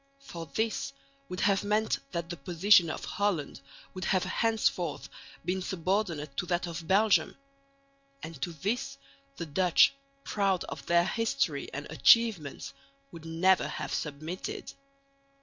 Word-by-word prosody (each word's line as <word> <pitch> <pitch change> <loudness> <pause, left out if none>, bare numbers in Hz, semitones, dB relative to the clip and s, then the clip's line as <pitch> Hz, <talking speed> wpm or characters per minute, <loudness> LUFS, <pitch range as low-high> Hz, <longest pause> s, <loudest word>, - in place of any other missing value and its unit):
For 170 -12 -8
this 220 - -2 0.4
would 180 - -4
have 200 -1 +3
meant 210 +2 +1
that 170 -1 -4
the - - -3
position 175 +3 +4
of - - -5
Holland 190 -8 -2 0.3
would 185 -1 -5
have 185 -1 +2
henceforth 220 +4 0 0.4
been 185 +1 -1
subordinate 180 -5 -2
to 180 - -2
that 175 -1 0
of 170 -1 -6
Belgium; 205 +3 +3 0.9
and 160 -4 -8
to 170 - -2
this 215 - -3 0.4
the 170 - -4
Dutch, 175 - +4 0.3
proud 195 -3 0
of - - -8
their 170 0 +4
history 225 - -1
and 140 +2 -5
achievements, 185 - +3 0.4
would 165 -1 -11
never 170 +3 +3
have - - -5
submitted. 155 +5 -5
180 Hz, 130 wpm, -29 LUFS, 165-205 Hz, 0.9 s, position